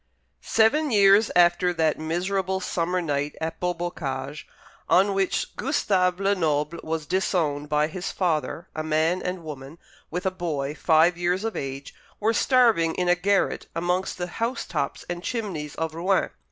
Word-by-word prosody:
Seven 290 Hz, +8 st, +3 dB
years 200 Hz, -1 st, +5 dB
after 175 Hz, +1 st, +4 dB
that 160 Hz, -2 st, +1 dB
miserable 190 Hz, +4 st, -1 dB
summer 180 Hz, 0 st, -1 dB
night 145 Hz, -1 st, -2 dB
at 160 Hz, 0 st, -4 dB
Beaubocage 155 Hz, -6 st, -4 dB, 0.4 s
on 195 Hz, +2 st, +4 dB
which 195 Hz, -1 st, -1 dB
Gustave 190 Hz, -, +1 dB
Lenoble 165 Hz, -5 st, 0 dB
was 160 Hz, -1 st, -3 dB
disowned 150 Hz, -4 st, 0 dB
by 150 Hz, 0 st, +2 dB
his 175 Hz, +4 st, -5 dB
father, 165 Hz, -1 st, -1 dB
a 155 Hz, -, -2 dB
man 160 Hz, +3 st, +1 dB
and 180 Hz, -1 st, -4 dB
woman, 145 Hz, 0 st, -8 dB, 0.3 s
with 180 Hz, +3 st, -4 dB
a 190 Hz, -, +2 dB
boy 150 Hz, -6 st, -3 dB
five 165 Hz, +2 st, +3 dB
years 180 Hz, +3 st, 0 dB
of 225 Hz, -1 st, -3 dB
age, 135 Hz, 0 st, -5 dB, 0.3 s
were 220 Hz, +2 st, +2 dB
starving 225 Hz, -10 st, +3 dB
in 180 Hz, -1 st, 0 dB
a 175 Hz, -, +5 dB
garret 195 Hz, +2 st, 0 dB
amongst 180 Hz, +3 st, -1 dB
the 175 Hz, -, -2 dB
housetops 230 Hz, +8 st, -3 dB
and 175 Hz, 0 st, -4 dB
chimneys 185 Hz, -, -4 dB
of 160 Hz, -1 st, -3 dB
Rouen. 185 Hz, +4 st, +1 dB
175 Hz, 150 wpm, -25 LUFS, 155-190 Hz, 0.4 s, years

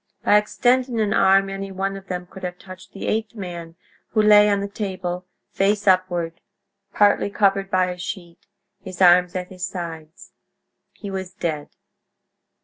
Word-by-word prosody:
By 205 Hz, -, +5 dB
extending 245 Hz, +3 st, +1 dB
an 210 Hz, -1 st, +1 dB
arm 195 Hz, 0 st, +4 dB
any 195 Hz, 0 st, -5 dB
one 195 Hz, +1 st, -2 dB
of 195 Hz, 0 st, -10 dB
them 180 Hz, -1 st, -4 dB
could 190 Hz, +2 st, -13 dB
have 180 Hz, -1 st, -5 dB
touched 185 Hz, 0 st, -13 dB
the 195 Hz, -, -7 dB
eighth 220 Hz, +1 st, -2 dB
man, 170 Hz, -4 st, -7 dB, 0.4 s
who 215 Hz, -, +4 dB
lay 210 Hz, 0 st, +7 dB
on 200 Hz, -1 st, +2 dB
the 200 Hz, -, -3 dB
table, 185 Hz, -3 st, -5 dB, 0.2 s
face 205 Hz, +1 st, +1 dB
upward, 175 Hz, -3 st, +1 dB, 0.5 s
partly 205 Hz, 0 st, +3 dB
covered 195 Hz, -1 st, +1 dB
by 185 Hz, -1 st, +1 dB
a 180 Hz, -, -8 dB
sheet, 175 Hz, -3 st, -8 dB, 0.4 s
his 185 Hz, -2 st, -9 dB
arms 180 Hz, 0 st, +5 dB
at 180 Hz, 0 st, -4 dB
his 185 Hz, -1 st, -5 dB
sides. 165 Hz, -3 st, -8 dB, 0.6 s
He 200 Hz, -2 st, -8 dB
was 190 Hz, -1 st, -5 dB
dead. 155 Hz, -5 st, -3 dB
190 Hz, 160 wpm, -22 LUFS, 180-200 Hz, 0.6 s, lay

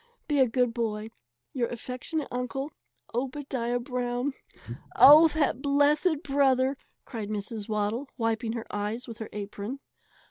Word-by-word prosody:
Be 295 Hz, -2 st, +1 dB
a 260 Hz, -, +6 dB
good 245 Hz, 0 st, +1 dB
boy. 220 Hz, -2 st, -2 dB, 0.4 s
Your 245 Hz, -3 st, 0 dB
affectionate 255 Hz, +6 st, -4 dB
uncle, 250 Hz, +4 st, -3 dB, 0.4 s
OBADIAH 250 Hz, -1 st, -2 dB
BROWN. 250 Hz, +1 st, -2 dB, 0.6 s
"Oh, 305 Hz, +4 st, +10 dB
that 295 Hz, -5 st, 0 dB
blessed 290 Hz, +3 st, +2 dB
brother!" 270 Hz, -1 st, +2 dB, 0.3 s
cried 220 Hz, -4 st, -5 dB
Mrs. 210 Hz, +1 st, -4 dB
Waddle, 215 Hz, +5 st, -1 dB
wiping 225 Hz, -1 st, -1 dB
her 230 Hz, -1 st, -4 dB
eyes 210 Hz, +4 st, -3 dB
with 230 Hz, 0 st, -8 dB
her 220 Hz, -, -6 dB
apron. 210 Hz, +5 st, -5 dB
245 Hz, 130 wpm, -28 LUFS, 225-275 Hz, 0.6 s, Oh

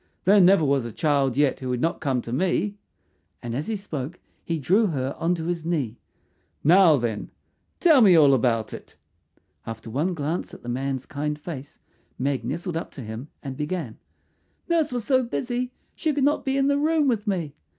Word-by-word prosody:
"There 200 Hz, +2 st, +6 dB
never 180 Hz, -3 st, +5 dB
was 140 Hz, -2 st, +2 dB
a 120 Hz, -, -5 dB
child 140 Hz, 0 st, +1 dB
yet 145 Hz, -2 st, +2 dB
who 130 Hz, -, -5 dB
would 125 Hz, -1 st, -1 dB
not 165 Hz, +5 st, -1 dB
come 130 Hz, -4 st, 0 dB
to 115 Hz, -, -6 dB
me," 190 Hz, +6 st, 0 dB, 0.6 s
and 120 Hz, -1 st, -4 dB
as 140 Hz, +5 st, -3 dB
he 225 Hz, -, -1 dB
spoke 170 Hz, -5 st, -6 dB, 0.2 s
he 165 Hz, -, -2 dB
drew 195 Hz, -, +3 dB
her 135 Hz, -5 st, -2 dB
on 175 Hz, +2 st, +1 dB
to 160 Hz, -2 st, -5 dB
his 170 Hz, -1 st, -2 dB
knee. 145 Hz, -9 st, -2 dB, 0.6 s
"Now, 170 Hz, -1 st, +6 dB
then, 115 Hz, -4 st, -3 dB, 0.5 s
tell 315 Hz, -7 st, +6 dB
me 195 Hz, -6 st, +7 dB
all 145 Hz, -4 st, +6 dB
about 115 Hz, -4 st, +1 dB
it." -, -, -10 dB, 0.7 s
After 115 Hz, 0 st, -7 dB
one 160 Hz, +9 st, 0 dB
glance 155 Hz, +3 st, -3 dB
at -, -, -15 dB
the 120 Hz, -, -6 dB
man's 135 Hz, +1 st, -2 dB
kind 150 Hz, +1 st, -3 dB
face 150 Hz, -2 st, -8 dB, 0.4 s
Meg 135 Hz, -2 st, -1 dB
nestled 165 Hz, +7 st, -3 dB
up 165 Hz, -, -4 dB
to 140 Hz, -, -8 dB
him 110 Hz, +4 st, -7 dB, 0.2 s
and 135 Hz, -2 st, -5 dB
began, 150 Hz, -5 st, -4 dB, 0.7 s
"Nurse 330 Hz, -4 st, +1 dB
was 245 Hz, -3 st, -3 dB
so 260 Hz, -2 st, +3 dB
busy 245 Hz, 0 st, -2 dB, 0.2 s
she 315 Hz, -, -1 dB
could 285 Hz, -2 st, 0 dB
not 290 Hz, +2 st, +2 dB
be 270 Hz, 0 st, 0 dB
in 270 Hz, -, +2 dB
the 285 Hz, 0 st, +2 dB
room 310 Hz, 0 st, +2 dB
with 225 Hz, -5 st, 0 dB
me. 170 Hz, -8 st, -1 dB
160 Hz, 195 wpm, -25 LUFS, 135-200 Hz, 0.7 s, me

